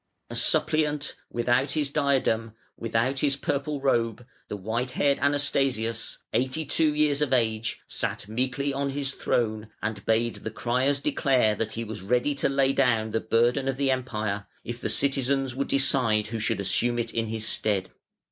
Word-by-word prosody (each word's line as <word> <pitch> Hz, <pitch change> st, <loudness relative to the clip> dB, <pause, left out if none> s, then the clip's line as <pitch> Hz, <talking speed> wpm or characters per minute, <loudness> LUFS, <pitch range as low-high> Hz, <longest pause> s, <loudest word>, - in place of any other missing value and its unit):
A -, -, -5 dB
suppliant, 150 Hz, -1 st, +1 dB
without 120 Hz, +3 st, +1 dB
his 150 Hz, -3 st, -1 dB
diadem, 130 Hz, -7 st, +1 dB, 0.2 s
without 115 Hz, +4 st, 0 dB
his 140 Hz, -1 st, +2 dB
purple 145 Hz, 0 st, -2 dB
robe, 120 Hz, -3 st, 0 dB, 0.2 s
the 105 Hz, -, -5 dB
white 115 Hz, +6 st, -2 dB
haired 140 Hz, -1 st, +3 dB
Anastasius, 135 Hz, -5 st, 0 dB, 0.2 s
eighty 130 Hz, +5 st, 0 dB
two 155 Hz, +1 st, +2 dB
years 150 Hz, -1 st, +2 dB
of 150 Hz, -, +1 dB
age, 110 Hz, -2 st, 0 dB
sat -, -, -3 dB
meekly 130 Hz, +5 st, -1 dB
on 140 Hz, 0 st, -1 dB
his 140 Hz, 0 st, -3 dB
throne, 110 Hz, -4 st, -1 dB
and 105 Hz, -2 st, -4 dB
bade 115 Hz, +1 st, +1 dB
the -, -, -5 dB
criers 130 Hz, +5 st, 0 dB
declare 125 Hz, -8 st, +2 dB
that 110 Hz, +1 st, -3 dB
he 115 Hz, -, -3 dB
was 110 Hz, -3 st, -7 dB
ready 125 Hz, +8 st, +1 dB
to 140 Hz, -, 0 dB
lay 135 Hz, 0 st, +2 dB
down 115 Hz, -5 st, +2 dB
the 115 Hz, -, +1 dB
burden 120 Hz, +4 st, +2 dB
of 135 Hz, -1 st, -1 dB
the 135 Hz, -1 st, +2 dB
Empire 110 Hz, -6 st, -2 dB, 0.2 s
if 120 Hz, 0 st, -6 dB
the -, -, -1 dB
citizens 135 Hz, -1 st, +1 dB
would 140 Hz, +2 st, -2 dB
decide 115 Hz, -6 st, +2 dB
who 115 Hz, 0 st, -3 dB
should 110 Hz, -1 st, 0 dB
assume 115 Hz, +5 st, +1 dB
it 115 Hz, -1 st, -2 dB
in 115 Hz, -1 st, -1 dB
his 110 Hz, 0 st, -3 dB
stead. 100 Hz, -4 st, 0 dB
125 Hz, 170 wpm, -26 LUFS, 110-140 Hz, 0.2 s, haired